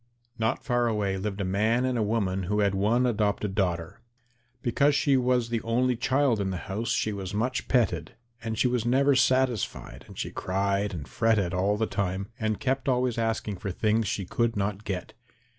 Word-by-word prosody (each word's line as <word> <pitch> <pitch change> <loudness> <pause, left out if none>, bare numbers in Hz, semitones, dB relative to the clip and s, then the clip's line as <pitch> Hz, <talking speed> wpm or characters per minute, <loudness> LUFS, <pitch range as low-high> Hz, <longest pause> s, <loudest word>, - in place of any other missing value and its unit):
Not 110 0 0
far 120 -2 +1
away 105 -4 0
lived 100 +1 -3
a - - -1
man 110 +6 +1
and 130 -1 0
a 115 - +1
woman 100 -4 0
who 105 0 +2
had 100 -1 +2
one 110 +6 +2
adopted 105 -3 0
daughter. 90 -1 -2 0.6
Because 140 +4 +3
she 140 -1 +3
was 125 -2 +2
the 115 -1 -1
only 125 +2 +1
child 130 -2 +1
in 95 - -1
the 95 - -3
house 110 +4 -3
she 110 - 0
was 100 0 -5
much 125 +5 -1
petted, 120 -6 +1 0.3
and 110 -1 -3
she 125 - +3
was 125 -2 0
never 135 +4 +3
satisfied, 130 -3 0
and - - -13
she - - -3
cried 100 +2 -1
and 75 -3 -6
fretted 110 -6 +1
all 100 +3 +1
the 110 - +1
time, 100 -1 -2
and 110 -2 -1
kept 135 0 0
always 125 -2 +1
asking 110 -3 -1
for 100 - -5
things 110 +3 +1
she 95 0 -2
could 115 +5 0
not 100 +1 -2
get. 90 -4 -4
110 Hz, 195 wpm, -27 LUFS, 100-125 Hz, 0.6 s, Because